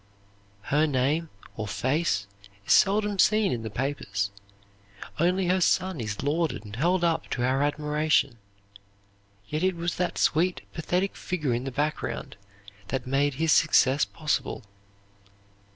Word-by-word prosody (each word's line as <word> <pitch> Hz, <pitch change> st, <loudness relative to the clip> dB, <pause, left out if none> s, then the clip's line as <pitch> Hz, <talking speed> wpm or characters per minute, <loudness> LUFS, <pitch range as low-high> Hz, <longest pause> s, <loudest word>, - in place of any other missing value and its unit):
Her 155 Hz, +2 st, +4 dB
name 145 Hz, +4 st, 0 dB, 0.3 s
or 110 Hz, -1 st, -4 dB
face 130 Hz, -1 st, 0 dB, 0.4 s
is -, -, +4 dB
seldom 205 Hz, 0 st, +3 dB
seen 215 Hz, 0 st, +4 dB
in 120 Hz, -, -2 dB
the 110 Hz, -, -5 dB
papers; 100 Hz, -5 st, -2 dB, 0.9 s
only 180 Hz, +3 st, +2 dB
her 185 Hz, +1 st, +2 dB
son 185 Hz, -1 st, +1 dB
is 105 Hz, -2 st, -4 dB
lauded 145 Hz, -6 st, -1 dB
and 105 Hz, 0 st, -8 dB
held 175 Hz, +8 st, +1 dB
up 165 Hz, -1 st, 0 dB
to 120 Hz, -, -2 dB
our 130 Hz, +2 st, +1 dB
admiration. 150 Hz, -3 st, +1 dB, 1.1 s
Yet 155 Hz, +6 st, -2 dB
it 185 Hz, 0 st, +1 dB
was 170 Hz, 0 st, -3 dB
that 180 Hz, -1 st, -1 dB
sweet, 175 Hz, +3 st, +2 dB
pathetic 180 Hz, +4 st, -1 dB
figure 150 Hz, -9 st, -2 dB
in 120 Hz, +2 st, -2 dB
the 135 Hz, -, -3 dB
background 150 Hz, +4 st, -3 dB, 0.5 s
that 130 Hz, -2 st, -3 dB
made 135 Hz, +1 st, +1 dB
his 160 Hz, +3 st, +1 dB
success 145 Hz, -3 st, +4 dB
possible. 150 Hz, -4 st, -2 dB
150 Hz, 135 wpm, -27 LUFS, 130-175 Hz, 1.1 s, Her